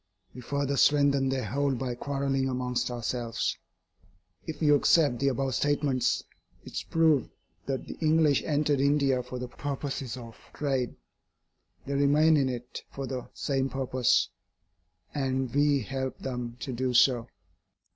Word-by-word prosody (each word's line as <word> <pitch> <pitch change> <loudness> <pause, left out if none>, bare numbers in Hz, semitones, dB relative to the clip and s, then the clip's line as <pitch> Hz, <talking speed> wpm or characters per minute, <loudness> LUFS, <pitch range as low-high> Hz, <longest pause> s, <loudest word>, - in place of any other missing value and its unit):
We 125 - -9
further 140 +2 -1
strengthen 140 -2 +4
their 130 -1 -1
hold 140 0 0
by 125 0 -2
quarrelling 135 +1 -1
amongst 125 -1 -1
ourselves. 120 -1 -2 0.9
If 155 -2 -5
you 150 -2 +4
accept 145 -3 +4
the 140 - +1
above 135 0 0
statements, 145 0 +1 0.4
it - - -9
is - - -2
proved 160 -6 +2 0.4
that 135 -1 -2
the - - -6
English 155 -2 +3
entered 150 -2 +1
India 140 -2 +2
for 125 - -7
the 125 0 -4
purposes 135 -1 -4
of 115 -3 -10 0.2
trade. 135 -4 -1 0.9
They 140 - -3
remain 145 +3 +4
in 135 -3 +2
it 125 -1 -6
for 135 - -5
the 130 -1 -5
same 135 -2 -1
purpose, 130 -2 +1 0.8
and 130 -3 -1
we 145 -1 +3
help 130 +2 -4
them 125 -2 -5
to 130 +1 -4
do 125 +1 -1
so. 120 -1 +4
135 Hz, 145 wpm, -28 LUFS, 125-145 Hz, 0.9 s, strengthen